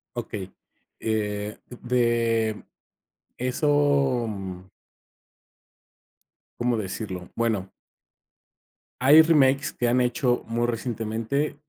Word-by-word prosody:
Okey. 105 Hz, -5 st, -5 dB, 0.5 s
Eh, 105 Hz, -1 st, -2 dB, 0.2 s
de 115 Hz, -3 st, +1 dB, 0.7 s
eso, 140 Hz, -1 st, +2 dB
mm 95 Hz, -3 st, -7 dB, 1.9 s
¿Cómo 120 Hz, 0 st, +1 dB
decirlo? 95 Hz, -3 st, -5 dB
Bueno 110 Hz, -5 st, -1 dB, 1.3 s
hay 145 Hz, +5 st, +8 dB
remakes 145 Hz, -3 st, +3 dB
que 120 Hz, -, -1 dB
han 125 Hz, +1 st, +3 dB
hecho 125 Hz, 0 st, +1 dB
muy 120 Hz, +1 st, 0 dB
recientemente, 115 Hz, +4 st, -2 dB
120 Hz, 75 wpm, -25 LUFS, 110-130 Hz, 1.9 s, hay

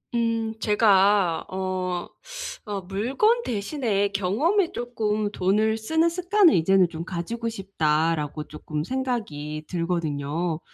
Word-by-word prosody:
음 230 Hz, -1 st, 0 dB
제가 200 Hz, -4 st, +3 dB
어 185 Hz, -1 st, -3 dB, 0.6 s
어 205 Hz, -2 st, -3 dB
'물건 255 Hz, -, +1 dB
대신에 210 Hz, -, -1 dB
경험에 260 Hz, -, +1 dB
조금 215 Hz, -3 st, -1 dB
돈을 210 Hz, +3 st, +1 dB
쓰는 320 Hz, +9 st, +1 dB
습관을 360 Hz, +2 st, +4 dB
이제는 185 Hz, +2 st, +4 dB
좀 165 Hz, 0 st, -6 dB
가지고 190 Hz, +7 st, -4 dB
싶다.'라고 160 Hz, -6 st, -1 dB
쪼끔 150 Hz, 0 st, -5 dB
생각이 190 Hz, -, -3 dB
들거든요. 165 Hz, -2 st, -2 dB
200 Hz, 235 characters per minute, -25 LUFS, 170-230 Hz, 0.6 s, 습관을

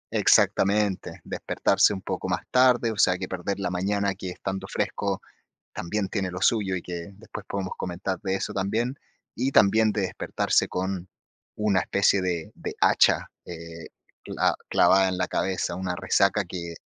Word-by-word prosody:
Exactamente, 100 Hz, -1 st, +2 dB
despertarse -, -, +2 dB
un 95 Hz, -2 st, -4 dB
poco 95 Hz, 0 st, -4 dB
más 90 Hz, 0 st, 0 dB
tarde, 125 Hz, -2 st, +4 dB
o 110 Hz, -, -7 dB
sea, 90 Hz, -, +4 dB
que 95 Hz, 0 st, -5 dB
perder 95 Hz, +2 st, -3 dB
la 95 Hz, -2 st, -2 dB
mañana 100 Hz, +2 st, 0 dB
que, 95 Hz, -1 st, -7 dB
estando 95 Hz, +1 st, -5 dB
fresco -, -, -2 dB, 0.6 s
también 100 Hz, +3 st, -2 dB
tiene 95 Hz, -2 st, -2 dB
lo 90 Hz, 0 st, -6 dB
suyo 100 Hz, -2 st, +2 dB
y, -, -, -3 dB
que 85 Hz, +2 st, -7 dB
después 110 Hz, -1 st, -9 dB
podemos 95 Hz, -1 st, -4 dB
comentar 95 Hz, +1 st, -3 dB
de 95 Hz, -2 st, -1 dB
eso -, -, -4 dB
también. 110 Hz, +6 st, -1 dB, 0.4 s
Y, 130 Hz, +4 st, -1 dB
también, 110 Hz, +1 st, +5 dB
de 105 Hz, -, -1 dB
despertarse 95 Hz, -, 0 dB
con 95 Hz, 0 st, -3 dB, 0.5 s
una 105 Hz, -3 st, +2 dB
especie 100 Hz, 0 st, +2 dB
de 85 Hz, -3 st, -2 dB
de -, -, -6 dB
hacha, -, -, +4 dB, 0.2 s
eh, 85 Hz, -1 st, -9 dB, 0.4 s
cla -, -, +1 dB, 0.2 s
clavada 95 Hz, 0 st, +5 dB
en 90 Hz, -, -3 dB
la 90 Hz, -, 0 dB
cabeza, 95 Hz, -2 st, -1 dB
una 90 Hz, 0 st, -3 dB
resaca 100 Hz, +2 st, +2 dB
que 85 Hz, -1 st, -6 dB
95 Hz, 165 wpm, -26 LUFS, 90-100 Hz, 0.6 s, también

